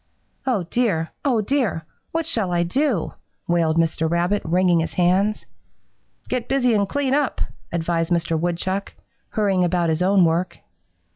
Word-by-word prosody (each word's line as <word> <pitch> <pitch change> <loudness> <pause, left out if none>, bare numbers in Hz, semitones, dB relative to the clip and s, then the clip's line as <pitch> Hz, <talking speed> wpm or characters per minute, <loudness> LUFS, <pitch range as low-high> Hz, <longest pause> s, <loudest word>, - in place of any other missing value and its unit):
"'Oh, 225 -8 +1
dear! 170 -4 0
Oh, 250 -6 +2
dear! 210 - -1 0.3
What 330 0 -1
shall 220 - 0
I 175 0 +2
do?' 240 - 0 0.4
wailed 165 -2 +2
Mr. 160 -1 +1
Rabbit, 175 +4 +1
wringing 175 +1 +2
his 165 - -3
hands. 190 +4 +2 0.8
"'Get 250 -2 -3
busy 250 -3 +2
and 200 -2 +1
clean 275 +1 0
up,' 290 -1 0 0.3
advised 165 -1 -1
Mr. 170 -1 +1
Woodchuck, 175 +4 -2 0.4
hurrying 195 -4 +1
about 175 -1 +1
his 160 +1 0
own 190 0 +4
work. 170 +3 0
180 Hz, 145 wpm, -22 LUFS, 170-225 Hz, 0.8 s, own